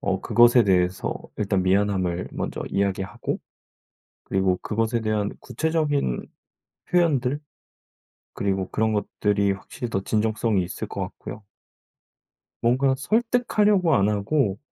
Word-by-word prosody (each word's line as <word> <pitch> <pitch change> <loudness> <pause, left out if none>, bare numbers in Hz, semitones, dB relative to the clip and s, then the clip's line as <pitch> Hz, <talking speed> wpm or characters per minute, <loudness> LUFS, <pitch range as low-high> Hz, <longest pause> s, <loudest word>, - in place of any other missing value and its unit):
어 95 -1 -1
그것에 120 0 +5
대해서 90 -1 +1 0.2
일단 100 -3 0
미안함을 95 -2 +1
먼저 - - -4
이야기하고 100 0 -2 0.9
그리고 95 -1 +1
그것에 115 +2 0
대한 110 -2 0
구체적인 150 - -1 0.6
표현들 145 -6 +2 0.9
그리고 95 -2 -1
그런 110 0 0
것들이 100 -1 0
확실히 110 +4 -6
더 95 -3 -1
진정성이 110 -1 0
있을 90 - -5
것 - - -5
같고요. 105 +1 -7 1.2
뭔가 130 +3 +3
설득하려고 210 - +2
안 100 -4 +3
하고 105 0 0
105 Hz, 275 characters per minute, -24 LUFS, 95-130 Hz, 1.2 s, 그것에